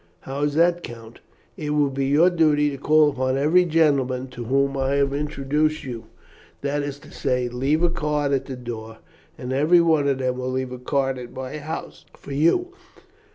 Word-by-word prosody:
"How 135 +1 -6
is 145 0 0
that, 170 +2 +3
Count?" 115 -5 -10 0.4
"It 150 -1 -3
will 145 -2 +2
be 135 0 -1
your 155 +6 +4
duty 150 -3 +3
to 140 - -6
call 150 +1 +4
upon 130 0 -1
every 160 +6 +4
gentleman 140 -6 +1
to 120 -2 -8
whom 140 +3 +1
I 135 0 0
have 140 -1 +1
introduced 150 +1 -1
you; 120 -4 -7 0.6
that 145 +1 -1
is 145 -1 -4
to - - -15
say, 125 -2 -1
to 120 - -8
leave 145 +6 +1
a 175 - +4
card 150 -3 -1
at 135 -2 0
the 135 - -5
door, 115 -2 -7 0.4
and 125 +1 -5
every 155 +6 +4
one 160 -4 +3
of 140 -2 +1
them 130 -1 -1
will 130 0 -3
leave 130 0 -2
a 125 - -7
card 135 0 -1
at 120 -1 -9
my 130 +3 -6
house 155 +2 -7
for - - -11
you. 170 - +2
140 Hz, 200 wpm, -23 LUFS, 130-150 Hz, 0.6 s, your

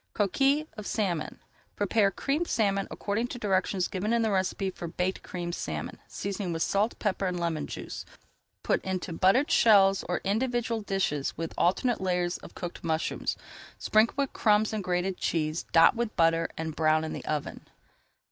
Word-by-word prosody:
COQUILLES 275 +9 +2
OF 215 - -6
SALMON 180 -8 -2 0.4
Prepare 205 0 +2
Creamed 285 - -1
Salmon 200 -3 +1
according 210 +4 -2
to 245 - -6
[Page - - -13
302] 210 - -2
directions 185 -1 +1
given 210 +3 -2
in 235 -1 +2
the 220 - +1
recipe 190 0 0
for 175 - -7
Baked 180 +3 -2
Creamed 175 -1 -5
Salmon, 75 - -4
seasoning 195 -2 -4
with 165 -1 0
salt, 210 +3 +1
pepper 195 -2 -1
and 180 -1 -2
lemon 165 -3 -2
juice. - - -6 0.6
Put - - +1
into 185 -2 -3
buttered 195 - +3
shells 195 -3 +5
or 180 - 0
individual 235 +2 0
dishes 190 -9 -1
with 165 0 -4
alternate 225 +7 +1
layers 180 -1 0
of - - -13
cooked 175 -1 -6
mushrooms. 160 -1 -1 0.4
Sprinkle 215 +2 +3
with 280 -2 0
crumbs 215 0 +3
and 215 -2 -2
grated 180 0 -1
cheese, 155 0 -1
dot 165 +7 +6
with 230 -2 -2
butter 165 -1 +3
and 160 -1 -4
brown 155 0 +3
in 160 - -4
the - - -6
oven. 150 -2 -4
190 Hz, 175 wpm, -28 LUFS, 170-215 Hz, 0.6 s, dot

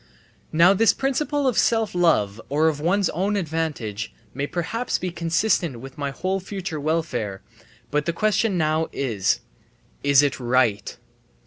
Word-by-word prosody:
Now 170 +4 +6
this 225 +3 +4
principle 280 +1 0
of 250 - +2
self 225 -3 +2
love 115 - +2
or 150 +3 +2
of 155 -2 0
one's 185 +5 +2
own 195 +6 0
advantage 155 - -3 0.2
may 140 +2 -2
perhaps 220 +10 -2
be 180 0 -4
consistent 170 - 0
with 135 +2 -10
my 140 -1 -3
whole 185 +7 -2
future 190 -4 -5
welfare; 140 -10 -2 0.5
but 150 +2 0
the - - +2
question 210 +1 +1
now 155 0 +1
is, 115 -8 0 0.6
"Is 140 0 +5
it 140 -2 0
right?" 120 -5 +1
160 Hz, 145 wpm, -23 LUFS, 135-190 Hz, 0.6 s, Now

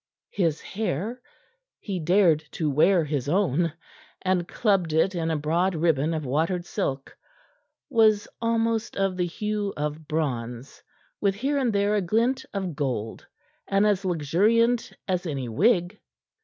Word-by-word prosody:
His 165 -5 0
hair 215 - -3 0.6
he 195 -4 -4
dared 175 -1 +4
to 155 -3 -1
wear 165 +5 +4
his 145 -2 -2
own, 170 -2 +1 0.5
and 185 -2 +1
clubbed 195 -8 +1
it 160 +5 +3
in 165 -2 -1
a 160 - 0
broad 170 +5 0
ribbon 160 -1 +1
of 155 -2 -3
watered 165 +7 0
silk 140 -8 -3 0.7
was 220 -6 +3
almost 230 -1 0
of 195 -1 +1
the 180 -1 0
hue 210 +2 -3
of 150 +1 -4
bronze, 125 -5 -3 0.4
with 200 -2 +2
here 275 +7 0
and 250 -4 +1
there 200 0 +1
a 210 - +2
glint 235 +8 +1
of 190 -5 -3
gold, 125 -6 -3 0.4
and 195 +1 +2
as 205 -2 +2
luxuriant 205 - +2 0.2
as 185 -2 -1
any 135 -5 -3
wig. 175 - +2
180 Hz, 140 wpm, -25 LUFS, 155-210 Hz, 0.7 s, dared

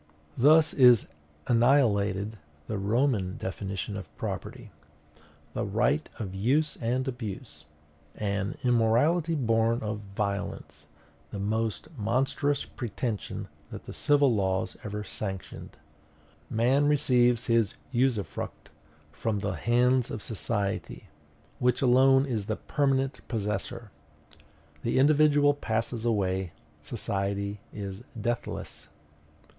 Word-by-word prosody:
Thus 155 +5 +5
is 125 - +6 0.4
annihilated 110 -5 +2 0.3
the 110 -2 -3
Roman 105 -2 +1
definition 95 +1 -4
of 100 - -7
property - - -5 0.8
THE - - -2
RIGHT 120 +9 +1
OF 100 -6 -5
USE 135 +11 +1
AND 125 +3 0
ABUSE 120 -6 -6 0.5
an 100 -1 -2
immorality 125 +8 +3
born 115 -3 +1
of 105 0 -3 0.2
violence, 100 -1 -4 0.4
the - - -6
most 110 +2 -2
monstrous 135 +6 0
pretension 115 -2 -4 0.2
that - - -9
the - - -8
civil 145 -3 +3
laws 95 -3 0
ever 105 0 -4
sanctioned. 95 -2 -6 0.7
Man 130 +6 +3
receives 125 -5 +3
his 115 -3 +2 0.2
usufruct 125 -5 -2 0.4
from 110 -2 -2
the 100 -1 -2
hands 125 +6 +2
of 105 - -5
society, 105 -2 -2 0.5
which 125 +1 +2
alone 135 +2 +5
is 110 -7 -3
the 110 - 0
permanent 135 0 0
possessor. 110 +1 -3 0.9
The 115 - 0
individual 145 +1 +5
passes 115 -3 -2
away, 95 -5 0 0.3
society 100 +1 -2
is 100 0 -6 0.2
deathless. 120 +3 -4
115 Hz, 105 wpm, -28 LUFS, 100-130 Hz, 0.9 s, is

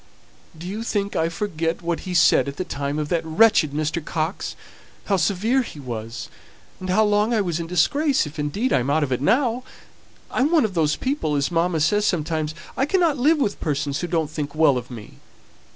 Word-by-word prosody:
"Do 165 - -9
you 205 +4 -4
think 205 -3 -2
I 165 +1 +1
forget 165 -2 -3
what 170 +2 -3
he 180 - -3
said 165 -3 +5
at 140 - -6
the - - -1
time 140 -2 -3
of 150 -1 -2
that 170 -2 0
wretched 160 -1 +4
Mr. 155 +2 -2
Coxe; 160 +4 -3 0.5
how 200 - +2
severe 205 +9 +1
he 190 - -8
was, 115 -3 -6 0.5
and 185 - -6
how 210 +4 +4
long 210 +3 +2
I 215 - +2
was 170 -4 -2
in 165 - -4
disgrace, 270 - +2
if 150 +1 -9
indeed 195 - -1
I'm 125 +1 +1
out 155 +2 +2
of 135 - -3
it 125 - 0
now? 245 - +2 0.7
I - - -2
am 290 +5 +2
one 320 -8 +4
of 205 - -3
those 155 -3 +1
people, 260 - -1
as 140 +3 0
mamma 170 0 +1
says 205 +7 +2
sometimes 155 -2 -1 0.2
I 270 - +1
cannot 330 -5 +2
live 305 +6 +4
with 210 -8 -1
persons 145 -2 -2
who 175 - -3
don't 160 -3 -1
think 150 -2 -4
well 155 -3 +4
of 125 0 -4
me. 115 -4 -11
165 Hz, 210 wpm, -23 LUFS, 150-210 Hz, 0.7 s, said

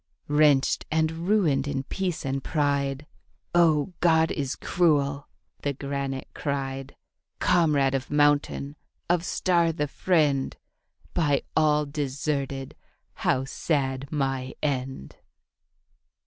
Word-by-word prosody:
Wrenched, 145 -2 +3
and 160 0 +1 0.2
ruined 155 -10 +2
in 135 -2 -2
peace 180 +1 -3
and 135 0 -2
pride, 140 -2 0 0.5
'Oh, 170 0 +3
God 160 -2 +4
is 140 -3 -2
cruel,' 145 -5 +1 0.3
the 145 - -1
granite 140 -1 -4
cried, 135 -2 -4 0.4
'Comrade 150 -6 +3
of 135 -1 -2
mountain, 145 0 +1 0.3
of 175 -1 +2
star 175 -2 +2
the 150 -2 -2
friend, 145 -4 +1 0.6
By 145 -5 +1
all 150 -1 +3
deserted 140 -1 -3 0.4
how 130 +1 0
sad 135 -1 -1
my 135 -3 -2
end.' 130 - -3
145 Hz, 105 wpm, -26 LUFS, 135-155 Hz, 0.6 s, God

